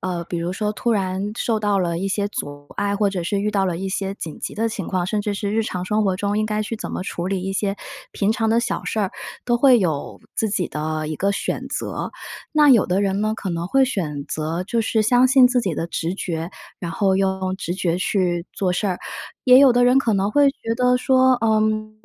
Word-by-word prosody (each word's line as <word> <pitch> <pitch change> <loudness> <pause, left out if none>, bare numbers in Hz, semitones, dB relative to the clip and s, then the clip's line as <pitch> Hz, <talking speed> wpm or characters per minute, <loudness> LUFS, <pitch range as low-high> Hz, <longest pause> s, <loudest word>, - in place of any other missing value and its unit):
呃， 180 -2 -3
比 175 0 -4
如 170 +2 -2
说 210 +1 -1
突 235 +3 -1
然 195 -1 -1
受 220 -2 0
到 205 -2 +1
了 170 -2 0
一 195 +2 -2
些 200 +1 0
阻 145 -7 -6
碍， 200 0 0
或 205 -1 +2
者 185 -3 -3
是 200 +4 -1
遇 210 +1 0
到 195 -2 +1
了 175 -2 -1
一 195 +2 -3
些 195 0 -2
紧 165 -6 -8
急 - - -5
的 225 +1 0
情 200 -5 -5
况， 185 -2 0
甚 210 +2 -1
至 205 0 -2
是 200 0 -3
日 225 +1 +2
常 180 -4 -4
生 215 +3 +1
活 190 -3 +1
中 205 +2 -1
应 215 - +1
该 215 0 -1
去 220 +1 -4
怎 - - -6
么 - - -3
处 175 -1 -4
理 190 -1 -1
一 195 +1 -3
些 195 +1 -1 0.3
平 205 +2 +1
常 225 0 0
的 225 +1 +3
小 235 +1 -2
事 - - -3
儿， 200 -3 0 0.3
都 240 -1 +2
会 255 -1 +6
有 160 -8 -2 0.2
自 220 - 0
己 190 -4 -1
的 155 0 -3
一 155 - -3
个 195 +6 0
选 200 - -3
择。 - - -4 0.4
那 300 -2 +6
有 235 -6 +5
的 185 +3 +1
人 195 0 0
呢， 215 +1 0
可 195 - -4
能 170 0 -3
会 270 +8 +4
选 155 - -3
择 160 +4 -3
就 230 +4 0
是 220 0 +1
相 245 +4 +4
信 260 -1 +7
自 250 0 +2
己 190 -8 -2
的 165 - -2
直 170 +1 -3
觉， 170 -3 -4 0.3
然 175 - -4
后 190 +2 +1
用 190 -1 0
直 175 -2 -4
觉 180 -2 -1
去 180 -2 0
做 185 -2 0
事 190 +4 -1
儿， 185 -2 -1 0.5
也 255 -1 +8
有 270 -2 +7
的 245 0 +4
人 250 +2 +5
可 235 -5 +1
能 195 +1 +1
会 285 +4 +4
觉 230 -4 -4
得 250 +1 +3
说， 260 0 +4
嗯， 215 -1 +1
200 Hz, 265 characters per minute, -22 LUFS, 180-220 Hz, 0.5 s, 也